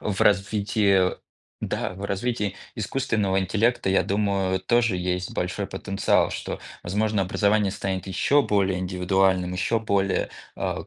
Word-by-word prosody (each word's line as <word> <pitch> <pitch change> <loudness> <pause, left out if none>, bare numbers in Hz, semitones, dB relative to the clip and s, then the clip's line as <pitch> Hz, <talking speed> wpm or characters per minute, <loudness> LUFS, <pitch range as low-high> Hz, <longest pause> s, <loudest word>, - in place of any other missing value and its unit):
в 100 -3 -3
развитии, 100 -1 +3 0.5
да, - - -2
в 100 +2 -7
развитии 100 -1 -2 0.2
искусственного 105 -3 0
интеллекта, 105 +2 +1
я 95 - +3
думаю, 100 -2 0
тоже 115 0 +2
есть 90 0 -2
большой 90 +3 -2
потенциал, 95 +1 +1
что, - - -5 0.2
возможно 105 +3 0
образование 100 +2 +2
станет 95 -1 -3
ещё 140 +9 +3
более 95 -4 +1
индивидуальным, 90 0 +1
ещё 95 +5 0
более, 100 -3 0 0.3
а - - -3
95 Hz, 125 wpm, -25 LUFS, 95-105 Hz, 0.5 s, развитии